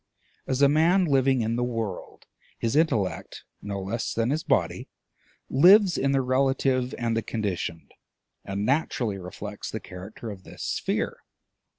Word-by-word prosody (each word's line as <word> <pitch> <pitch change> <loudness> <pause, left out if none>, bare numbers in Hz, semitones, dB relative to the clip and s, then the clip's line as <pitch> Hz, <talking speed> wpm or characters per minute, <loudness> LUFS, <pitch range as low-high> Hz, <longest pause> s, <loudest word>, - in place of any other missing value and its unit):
As 135 +1 +1
a - - +8
man 165 +6 +4
living 135 -4 +3
in 115 +1 -1
the 120 - 0
world, 115 -6 -4 0.3
his 115 +3 -1
intellect 115 - 0 0.2
no 100 -1 -4
less 105 +5 -3
than 115 +2 +1
his 155 +2 -1
body - - 0 0.6
lives 185 +6 +6
in 140 0 +1
the 135 -1 +2
relative 130 0 +1
and 115 -1 -1
the 115 - +1
conditioned, 95 -8 -4 0.5
and 100 +1 -3
naturally 120 -6 0
reflects 100 +3 -7
the 110 - -4
character 100 +5 -9
of 95 -2 -10
this - - -10
sphere. - - -2
120 Hz, 150 wpm, -26 LUFS, 105-135 Hz, 0.6 s, a